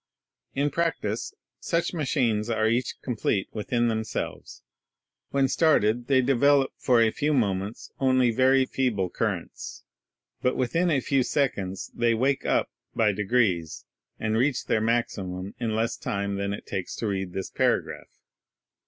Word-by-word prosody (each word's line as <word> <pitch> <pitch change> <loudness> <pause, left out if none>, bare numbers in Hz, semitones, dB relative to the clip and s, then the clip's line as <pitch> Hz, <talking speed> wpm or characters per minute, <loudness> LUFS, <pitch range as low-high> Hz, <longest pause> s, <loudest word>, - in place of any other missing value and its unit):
In 140 +2 +1
prac 170 +2 0
tice 105 +2 -3 0.3
such 170 +2 -1
machines 125 -9 0
are 110 -1 +1
each 120 +2 0
complete 110 -5 -1
within 120 +2 0
themselves. 110 -1 -4 0.7
When 135 -1 +2
started 120 -6 +2
they 130 -2 +4
develop 135 +1 +3
for 120 -3 +3
a 110 - +3
few 150 +4 0
moments 100 -3 -1
only 130 -2 +3
very 130 +3 +4
feeble 110 -10 -1
currents; - - -4 0.6
but 125 - +1
within 165 +8 +1
a 145 -5 +2
few 135 +1 +2
seconds 100 -9 -1
they 120 -1 +2
"wake 135 +4 0
up" - - +1 0.2
by 110 -2 +3
degrees, 100 -5 0 0.3
and 110 0 0
reach 130 +1 +1
their 110 - +1
maximum 100 -5 -1
in 115 -3 -1
less 115 +1 0
time 100 0 -2
than 100 0 -2
it 100 - -6
takes 95 - -4
to - - -4
read 95 -3 -2
this 95 -1 -4
paragraph. - - 0
115 Hz, 145 wpm, -26 LUFS, 105-135 Hz, 0.7 s, they